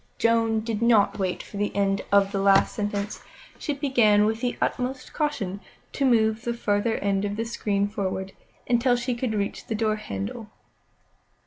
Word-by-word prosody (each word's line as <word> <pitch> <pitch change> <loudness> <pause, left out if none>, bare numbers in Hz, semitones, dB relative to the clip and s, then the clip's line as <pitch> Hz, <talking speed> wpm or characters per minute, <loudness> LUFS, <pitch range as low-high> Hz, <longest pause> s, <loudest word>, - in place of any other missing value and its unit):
Joan 225 -1 +2
did 225 -1 -3
not 230 -3 +3
wait 185 -2 -2
for 205 - -10
the 205 0 -2
end 195 -1 +1
of 200 -1 +4
the 200 - -1
last 195 0 +4
sentence. 205 0 -3 0.4
She 295 - -2
began 235 -7 +3
with 220 +1 -1
the 245 -1 -1
utmost 255 +1 -2
caution 220 - -2 0.3
to 275 - 0
move 220 -3 +3
the 235 0 -2
farther 215 0 0
end 195 0 0
of 205 0 -2
the 225 +2 -2
screen 205 -3 -1
forward, 195 -2 -3 0.4
until 245 +1 +3
she 245 +1 -1
could 235 -2 -2
reach 200 -1 -3
the 225 - -2
door 215 0 0
handle. 100 - -6
215 Hz, 175 wpm, -25 LUFS, 200-235 Hz, 0.4 s, of